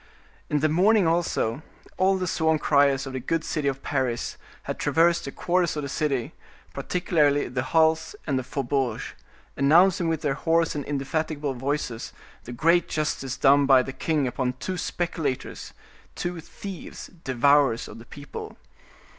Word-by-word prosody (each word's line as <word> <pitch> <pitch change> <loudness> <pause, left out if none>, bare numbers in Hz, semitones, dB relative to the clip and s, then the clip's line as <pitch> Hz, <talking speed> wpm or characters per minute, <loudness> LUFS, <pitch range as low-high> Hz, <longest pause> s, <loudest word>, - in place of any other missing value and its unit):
In 150 -1 +1
the 155 - +4
morning 190 +6 +4
also, 160 -7 0 0.3
all 190 +1 +3
the 185 - -2
sworn 160 -2 +1
criers 140 -2 +3
of 135 - -7
the 130 - -3
good 160 +6 -1
city 150 -3 -2
of 135 -1 -2
Paris 130 -4 -1 0.3
had - - -5
traversed 170 +1 +2
the 140 - -5
quarters 175 +1 0
of 150 - -2
the 140 - -4
city, 135 -4 -1 0.4
particularly 150 -5 +1
the 125 +1 -2
halles 160 +4 +2
and 140 -4 0
the - - -4
faubourgs, 130 -3 -2 0.4
announcing 170 +5 +4
with 160 -1 -2
their 145 -2 +1
hoarse 165 +3 +1
and 145 - -3
indefatigable 145 0 -2
voices 130 -2 -3 0.3
the 120 - -7
great 165 +8 +2
justice 140 -3 -2
done 140 0 +5
by 130 -2 +6
the 135 - -6
king 150 +1 0
upon 125 0 -1
two 185 +9 -5
speculators, 165 -6 -3 0.4
two 175 -1 -3
thieves, 190 +3 -9
devourers 135 -1 +3
of - - -10
the 115 - -12
people. 145 +4 -9
145 Hz, 155 wpm, -25 LUFS, 135-165 Hz, 0.4 s, by